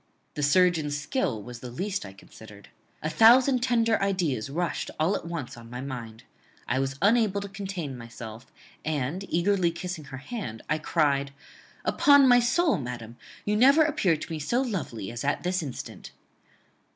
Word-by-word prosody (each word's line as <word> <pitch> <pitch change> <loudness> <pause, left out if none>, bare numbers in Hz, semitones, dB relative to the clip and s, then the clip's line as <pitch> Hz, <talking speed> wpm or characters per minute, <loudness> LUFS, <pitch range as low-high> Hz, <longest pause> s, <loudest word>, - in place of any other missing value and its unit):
The 150 - -4
surgeon's 155 -1 +3
skill 145 - -2
was 120 +1 -9
the 125 - -8
least 190 - -3
I 95 - -11
considered. 105 0 -15 0.3
A 155 - 0
thousand 250 - +6
tender 230 -3 +2
ideas 175 - 0
rushed 170 +4 -2
all 165 +6 +2
at - - -5
once 165 -7 -5
on 115 -1 -12
my 125 +1 -6
mind. 120 -4 -7 0.4
I 130 +3 +1
was 135 0 -1
unable 210 -2 +3
to 200 - -5
contain 190 -8 -5
myself, 115 0 -10 0.3
and, 155 +4 -2
eagerly 180 +1 +2
kissing 170 -2 -6
her 135 -1 -8
hand, 140 - -6
I 155 +1 0
cried 140 -3 +1 0.5
Upon 285 -2 +6
my 245 -1 +7
soul, 255 - +2
madam, 120 -3 -6 0.3
you 210 - +1
never 275 +8 +6
appeared 185 - +1
to - - -9
me 160 - -3
so 235 - 0
lovely 160 - -4
as 120 +1 -5
at 145 - 0
this 180 +1 0
instant. 140 -6 -7
160 Hz, 165 wpm, -27 LUFS, 130-205 Hz, 0.5 s, my